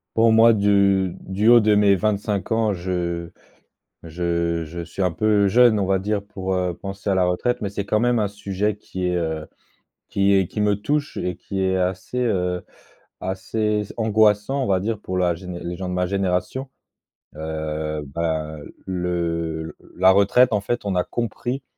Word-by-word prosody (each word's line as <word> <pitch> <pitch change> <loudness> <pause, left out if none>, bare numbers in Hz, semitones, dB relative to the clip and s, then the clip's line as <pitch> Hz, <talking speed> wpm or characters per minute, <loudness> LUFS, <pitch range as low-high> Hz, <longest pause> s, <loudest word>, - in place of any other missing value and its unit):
Pour 115 0 +5
moi, 115 +1 +6
du 100 -3 +2
du 100 +3 -1
haut 120 0 +8
de 105 -1 +3
mes 100 -1 +5
25 105 0 -1
ans, 110 -2 +2
je 85 -2 -3 0.7
je 85 0 -1
je 85 +3 -7
suis 85 +4 -5
un 90 -2 +1
peu 105 +2 +2
jeune, 120 +1 +5
on 100 - +1
va 95 0 +2
dire, 100 +1 -1
pour, 95 -2 -4
heu, 90 -1 0
penser 100 +3 -5
à - - +3
la 95 -1 +3
retraite, 120 +8 0
mais 105 - -2
c'est 100 0 -4
quand 105 +1 +1
même 120 0 +2
un 105 -2 +1
sujet 100 0 -2
qui 95 -3 -5
est, 90 - 0
heu, 80 -2 -2 0.6
qui 100 0 +3
est, 95 -2 +3
qui 105 - -4
me 105 -1 +3
touche 145 +8 -2
et 90 -1 -2
qui 95 +1 -4
est 95 0 +1
assez, 95 +6 -2
heu, 90 -7 0 0.6
assez 105 +3 -1
angoissant, 110 +4 +2
on - - -1
va 95 -2 +2
dire 110 +3 -2
pour 95 -3 -4
la 90 -2 +2
géné 90 0 -7
pour - - -7
les 90 - -4
gens 95 -1 -4
de - - -3
ma 90 0 0
génération. 95 +7 -1 0.7
Heu, 80 0 -4
ben, 80 +1 -3 0.3
le 85 -3 -2 0.2
la 95 +1 +6
retraite, 100 +6 +4
en 105 - +2
fait, 120 +4 -2
on 100 -2 -2
a 90 - +1
compris, 120 +3 -3
95 Hz, 185 wpm, -22 LUFS, 90-105 Hz, 0.7 s, haut